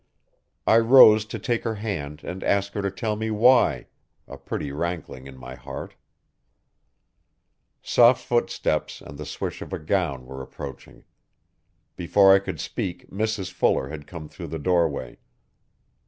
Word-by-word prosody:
I 110 Hz, -, +5 dB
rose 115 Hz, -3 st, +7 dB
to 110 Hz, -, -6 dB
take 115 Hz, +2 st, -2 dB
her 115 Hz, -2 st, -2 dB
hand 80 Hz, -9 st, -5 dB
and 95 Hz, +1 st, -6 dB
ask 100 Hz, 0 st, 0 dB
her 100 Hz, -, -2 dB
to 100 Hz, -, -1 dB
tell 105 Hz, +3 st, -3 dB
me 110 Hz, +1 st, -3 dB
why, 110 Hz, -, +4 dB, 0.4 s
a -, -, -9 dB
pretty 70 Hz, -, -5 dB
rankling 80 Hz, -4 st, -5 dB
in 65 Hz, -1 st, -12 dB
my 65 Hz, 0 st, -9 dB
heart, -, -, -8 dB, 1.9 s
Soft 120 Hz, +1 st, +4 dB
footsteps 120 Hz, -6 st, -1 dB
and 70 Hz, +1 st, -11 dB
the 75 Hz, -, -6 dB
swish -, -, -5 dB
of -, -, -8 dB
a -, -, -1 dB
gown 75 Hz, -6 st, -2 dB
were 65 Hz, +1 st, -8 dB
approaching. 65 Hz, -, -10 dB, 0.9 s
Before 95 Hz, +2 st, +5 dB
I 100 Hz, -, +6 dB
could 100 Hz, -, -6 dB
speak 90 Hz, -, -5 dB
Mrs 105 Hz, -2 st, -2 dB
Fuller 70 Hz, -6 st, +1 dB
had 75 Hz, -1 st, -8 dB
come 80 Hz, -2 st, -8 dB
through -, -, -9 dB
the 80 Hz, -, -5 dB
doorway. 80 Hz, -6 st, -1 dB
95 Hz, 150 wpm, -24 LUFS, 75-110 Hz, 1.9 s, rose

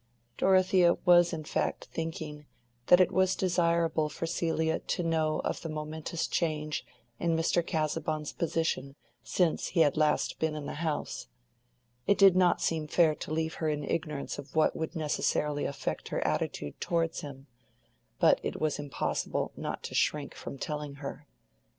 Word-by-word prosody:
Dorothea 185 Hz, -, +4 dB
was 175 Hz, -1 st, +6 dB
in 160 Hz, -3 st, -4 dB
fact -, -, -2 dB
thinking 155 Hz, -2 st, -5 dB, 0.4 s
that 180 Hz, -, +7 dB
it 185 Hz, -, +4 dB
was 190 Hz, 0 st, +3 dB
desirable 170 Hz, -3 st, +1 dB
for 160 Hz, -, -4 dB
Celia 160 Hz, -1 st, 0 dB
to 175 Hz, -, -2 dB
know 160 Hz, -2 st, +1 dB
of -, -, -2 dB
the 165 Hz, -, -5 dB
momentous 155 Hz, +2 st, -3 dB
change 155 Hz, -3 st, -1 dB, 0.4 s
in 165 Hz, -1 st, +1 dB
Mr. 170 Hz, +1 st, +2 dB
Casaubon's 155 Hz, -1 st, -2 dB
position 160 Hz, -4 st, -1 dB, 0.3 s
since 160 Hz, -, +1 dB
he 170 Hz, -, +2 dB
had 150 Hz, -1 st, +3 dB
last 155 Hz, -1 st, +1 dB
been 160 Hz, -1 st, 0 dB
in 150 Hz, -2 st, -5 dB
the 150 Hz, -, -5 dB
house: 155 Hz, -, -3 dB, 0.8 s
it 200 Hz, -, +4 dB
did 195 Hz, -2 st, +7 dB
not 180 Hz, -2 st, +4 dB
seem 160 Hz, -2 st, 0 dB
fair 160 Hz, 0 st, +4 dB
to 150 Hz, -, -7 dB
leave 160 Hz, 0 st, -1 dB
her 160 Hz, -, +1 dB
in 150 Hz, -1 st, -2 dB
ignorance 150 Hz, -2 st, -3 dB
of 140 Hz, -, -10 dB
what 155 Hz, -, +3 dB
would 160 Hz, -, -4 dB
necessarily 150 Hz, -1 st, 0 dB
affect 140 Hz, -, -3 dB
her -, -, -2 dB
attitude 75 Hz, -, -2 dB
towards 165 Hz, -1 st, 0 dB
him; 135 Hz, -2 st, -9 dB, 0.7 s
but -, -, +5 dB
it -, -, -4 dB
was 155 Hz, -2 st, 0 dB
impossible 145 Hz, -2 st, -2 dB
not -, -, -5 dB
to -, -, -6 dB
shrink 145 Hz, -2 st, 0 dB
from -, -, -8 dB
telling 150 Hz, 0 st, -4 dB
her. 145 Hz, +1 st, -7 dB
160 Hz, 160 wpm, -30 LUFS, 150-170 Hz, 0.8 s, that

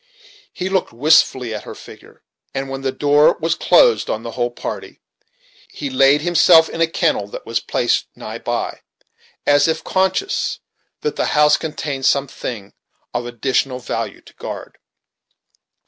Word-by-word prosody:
He 185 Hz, -, -4 dB
looked 190 Hz, 0 st, 0 dB
wistfully 130 Hz, -2 st, +3 dB
after 105 Hz, -, -6 dB
her -, -, -8 dB
figure, -, -, -15 dB, 0.3 s
and 135 Hz, 0 st, -3 dB
when 135 Hz, 0 st, -5 dB
the 135 Hz, -1 st, -1 dB
door 145 Hz, +2 st, +4 dB
closed 170 Hz, -, +3 dB
on 110 Hz, -, -2 dB
the 115 Hz, -, -6 dB
whole 120 Hz, +1 st, -1 dB
party, 120 Hz, -, -7 dB, 0.7 s
he 280 Hz, -, -6 dB
laid 145 Hz, -, +4 dB
himself 165 Hz, 0 st, +5 dB
in 165 Hz, -, -5 dB
a 165 Hz, -, +4 dB
kennel 165 Hz, -, 0 dB
that -, -, -9 dB
was -, -, -1 dB
placed -, -, 0 dB
nigh -, -, -7 dB
by, -, -, -3 dB, 0.7 s
as 145 Hz, +1 st, +4 dB
if 160 Hz, -, -1 dB
conscious 190 Hz, -, 0 dB, 0.4 s
that 445 Hz, -1 st, -3 dB
the -, -, +1 dB
house 150 Hz, 0 st, +6 dB
contained 145 Hz, -4 st, -3 dB
some 140 Hz, 0 st, +2 dB
thing 110 Hz, -6 st, -7 dB, 0.4 s
of 120 Hz, 0 st, -3 dB
additional 125 Hz, +2 st, -1 dB
value 125 Hz, -2 st, -5 dB
to -, -, -18 dB
guard. -, -, -8 dB
145 Hz, 150 wpm, -19 LUFS, 130-165 Hz, 0.7 s, house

